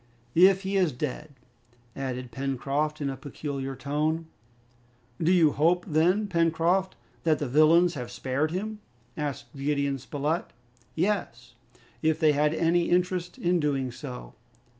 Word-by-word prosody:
"If 190 Hz, +3 st, +5 dB
he 195 Hz, +1 st, -1 dB
is 180 Hz, -5 st, +3 dB
dead," 150 Hz, +3 st, -4 dB, 0.7 s
added 125 Hz, -2 st, -4 dB
Pencroft, 140 Hz, +4 st, -2 dB
in 140 Hz, -, -1 dB
a -, -, -5 dB
peculiar 135 Hz, 0 st, -5 dB
tone. 155 Hz, +4 st, -1 dB, 1.0 s
"Do 165 Hz, +2 st, +3 dB
you 165 Hz, -5 st, +5 dB
hope, 170 Hz, +5 st, +2 dB
then, 180 Hz, +5 st, +2 dB
Pencroft, 170 Hz, +1 st, +1 dB, 0.3 s
that 160 Hz, -2 st, +3 dB
the 145 Hz, -, -3 dB
villains 160 Hz, +6 st, +5 dB
have 125 Hz, -4 st, -6 dB
spared 135 Hz, +5 st, -1 dB
him?" 210 Hz, +5 st, -4 dB, 0.4 s
asked 140 Hz, -5 st, -5 dB
Gideon 140 Hz, 0 st, -1 dB
Spilett. 145 Hz, +6 st, -3 dB, 0.4 s
"Yes, 165 Hz, -, -2 dB, 0.5 s
if 160 Hz, 0 st, +1 dB
they 155 Hz, -3 st, +5 dB
had 150 Hz, +1 st, +2 dB
any 170 Hz, +1 st, +2 dB
interest 180 Hz, 0 st, 0 dB
in 175 Hz, 0 st, +1 dB
doing 135 Hz, -4 st, 0 dB
so." -, -, -8 dB
155 Hz, 135 wpm, -27 LUFS, 140-175 Hz, 1.0 s, If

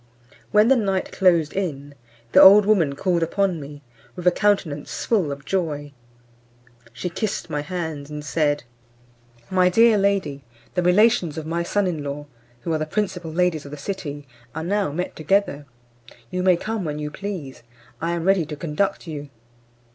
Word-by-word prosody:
When 210 Hz, -, +5 dB
the 270 Hz, -, +6 dB
night 195 Hz, -5 st, -1 dB
closed 170 Hz, -5 st, +3 dB
in, 145 Hz, -7 st, -4 dB, 0.4 s
the -, -, +7 dB
old 200 Hz, +2 st, +9 dB
woman 175 Hz, -10 st, +2 dB
called 175 Hz, +2 st, 0 dB
upon 180 Hz, 0 st, 0 dB
me, 145 Hz, +1 st, -10 dB, 0.3 s
with 180 Hz, -1 st, -8 dB
a 180 Hz, -, +6 dB
countenance 175 Hz, -7 st, 0 dB
full 195 Hz, -11 st, +1 dB
of 140 Hz, 0 st, -7 dB
joy. 150 Hz, -6 st, -2 dB, 1.0 s
She 125 Hz, +10 st, -5 dB
kissed 190 Hz, -1 st, -3 dB
my 150 Hz, -1 st, -1 dB
hands, 160 Hz, -4 st, -5 dB
and 150 Hz, -1 st, -7 dB
said, 150 Hz, -2 st, 0 dB, 0.9 s
"My 185 Hz, -1 st, +4 dB
dear 225 Hz, +2 st, +5 dB
lady, 195 Hz, -9 st, 0 dB, 0.3 s
the 180 Hz, -, +1 dB
relations 180 Hz, -2 st, +3 dB
of 160 Hz, -, -4 dB
my 170 Hz, +2 st, -1 dB
son 200 Hz, +4 st, 0 dB
in 165 Hz, -5 st, -2 dB
law, 145 Hz, +1 st, -5 dB, 0.4 s
who 165 Hz, -, -2 dB
are 155 Hz, -, 0 dB
the 155 Hz, -, -2 dB
principal 180 Hz, -2 st, -2 dB
ladies 175 Hz, -2 st, +1 dB
of 140 Hz, -, -10 dB
the 150 Hz, -, -8 dB
city, 145 Hz, -4 st, -6 dB, 0.3 s
are 160 Hz, -, -3 dB
now 200 Hz, -1 st, 0 dB
met 180 Hz, +5 st, -4 dB
together; 155 Hz, -3 st, 0 dB, 0.6 s
you 180 Hz, -, -1 dB
may 180 Hz, -1 st, +4 dB
come 220 Hz, +1 st, -3 dB
when 150 Hz, -3 st, -3 dB
you 150 Hz, 0 st, -4 dB
please; 180 Hz, -8 st, -6 dB, 0.4 s
I 170 Hz, +1 st, -1 dB
am 170 Hz, -1 st, -2 dB
ready 185 Hz, -4 st, +2 dB
to 150 Hz, -, -5 dB
conduct 170 Hz, +7 st, -2 dB
you." 145 Hz, -3 st, -7 dB
170 Hz, 170 wpm, -23 LUFS, 150-195 Hz, 1.0 s, old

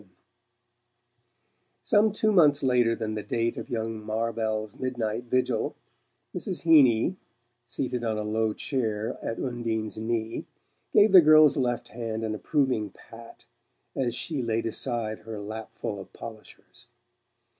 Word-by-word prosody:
VII 105 Hz, -, -23 dB, 1.8 s
Some 210 Hz, +1 st, +4 dB
two 215 Hz, +1 st, +1 dB
months 150 Hz, -7 st, +4 dB
later 125 Hz, -3 st, +3 dB
than 110 Hz, -2 st, -3 dB
the 105 Hz, -, -3 dB
date 115 Hz, +2 st, -1 dB
of -, -, -7 dB
young 115 Hz, -2 st, -3 dB
Marvell's 110 Hz, -1 st, -2 dB
midnight 120 Hz, -2 st, -2 dB
vigil, 130 Hz, +1 st, 0 dB, 0.6 s
Mrs. 185 Hz, -, -4 dB
Heeny, 150 Hz, 0 st, +5 dB, 0.5 s
seated 125 Hz, 0 st, -3 dB
on 110 Hz, -2 st, -1 dB
a 105 Hz, -, -2 dB
low 110 Hz, +1 st, 0 dB
chair 110 Hz, -6 st, -2 dB
at 115 Hz, -, -4 dB
Undine's 115 Hz, -4 st, -3 dB
knee, 110 Hz, 0 st, -3 dB, 0.4 s
gave 210 Hz, +1 st, +5 dB
the 185 Hz, -, +10 dB
girl's 155 Hz, -2 st, +7 dB
left 120 Hz, -4 st, -1 dB
hand 115 Hz, 0 st, -4 dB
an 110 Hz, -1 st, -2 dB
approving 125 Hz, -2 st, 0 dB
pat 115 Hz, 0 st, -14 dB, 0.5 s
as 120 Hz, -3 st, -1 dB
she 150 Hz, +1 st, -3 dB
laid 115 Hz, -1 st, -1 dB
aside 115 Hz, -1 st, -2 dB
her 110 Hz, -1 st, -7 dB
lapful 110 Hz, 0 st, -6 dB
of 95 Hz, -, -11 dB
polishers. 110 Hz, -2 st, -12 dB
115 Hz, 135 wpm, -27 LUFS, 110-130 Hz, 1.8 s, the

